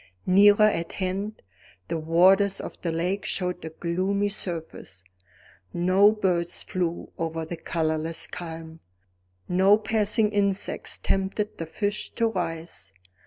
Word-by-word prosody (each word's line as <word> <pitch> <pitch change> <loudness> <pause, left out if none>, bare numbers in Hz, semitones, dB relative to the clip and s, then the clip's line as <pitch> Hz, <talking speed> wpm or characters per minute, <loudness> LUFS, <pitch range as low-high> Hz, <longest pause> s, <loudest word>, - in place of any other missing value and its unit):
Nearer 205 +3 +6
at 170 -6 0
hand, 195 +3 -3 0.4
the 165 - -2
waters 190 +5 +4
of - - -8
the 170 - -1
lake 180 +5 -1
showed 180 -2 -3
a 160 - -5
gloomy 185 +5 -1
surface; 165 - -5 0.7
no 185 +4 +4
birds 180 -5 -1
flew 175 -2 -3
over 165 -1 -3
the 170 - -5
colorless 160 0 -1
calm; 165 -1 -8 0.7
no 190 +3 +5
passing 215 0 +2
insects 200 -2 0
tempted 195 +2 -2
the 165 - -4
fish 205 +5 -3
to 230 -1 +2
rise. 165 - -4
180 Hz, 120 wpm, -26 LUFS, 165-200 Hz, 0.7 s, Nearer